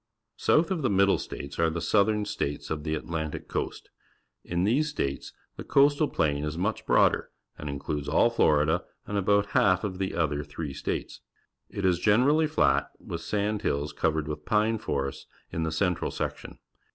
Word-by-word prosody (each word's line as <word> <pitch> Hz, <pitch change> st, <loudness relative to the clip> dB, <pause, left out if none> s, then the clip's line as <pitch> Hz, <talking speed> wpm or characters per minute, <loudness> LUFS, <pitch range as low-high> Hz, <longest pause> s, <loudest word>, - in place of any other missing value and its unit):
South 165 Hz, +3 st, +3 dB
of 180 Hz, -4 st, 0 dB
the 130 Hz, -, +1 dB
Middle 100 Hz, 0 st, +3 dB
States 70 Hz, 0 st, -7 dB
are 85 Hz, 0 st, +3 dB
the 80 Hz, +1 st, -3 dB
Southern 105 Hz, +4 st, +2 dB
States 75 Hz, -7 st, -3 dB
of 75 Hz, -1 st, -2 dB
the 80 Hz, 0 st, -1 dB
Atlantic 80 Hz, 0 st, -4 dB
Coast. -, -, -4 dB, 0.5 s
In 85 Hz, +1 st, -1 dB
these 135 Hz, +10 st, +2 dB
states 70 Hz, -, -3 dB, 0.3 s
the -, -, -6 dB
Coastal 145 Hz, +2 st, +4 dB
Plain 75 Hz, -, 0 dB
is 75 Hz, +1 st, -3 dB
much 100 Hz, +5 st, -2 dB
broader -, -, +3 dB, 0.3 s
and 75 Hz, -, -6 dB
in 70 Hz, -, -3 dB
cludes 75 Hz, 0 st, -4 dB
all 80 Hz, +10 st, +3 dB
Fhrida 80 Hz, -6 st, +3 dB, 0.2 s
and 105 Hz, -, -5 dB
about 100 Hz, +1 st, +2 dB
half 95 Hz, -1 st, +3 dB
of 95 Hz, -3 st, -4 dB
the 95 Hz, -1 st, -2 dB
other 75 Hz, -3 st, 0 dB
three 75 Hz, -1 st, -6 dB
states. -, -, -4 dB, 0.5 s
It 100 Hz, -, -3 dB
is 90 Hz, -2 st, +3 dB
generally 135 Hz, -, +4 dB
flat, 155 Hz, -, +2 dB
with 85 Hz, -, -6 dB
sand 105 Hz, +3 st, -1 dB
hills 70 Hz, -3 st, -1 dB
coA'ered 80 Hz, -1 st, 0 dB
with 75 Hz, 0 st, -5 dB
pine 110 Hz, +4 st, +1 dB
forests 70 Hz, -4 st, -3 dB, 0.2 s
in 80 Hz, -, -3 dB
the 80 Hz, -1 st, -1 dB
central 90 Hz, +1 st, 0 dB
section. -, -, -5 dB
90 Hz, 175 wpm, -27 LUFS, 75-105 Hz, 0.5 s, Coastal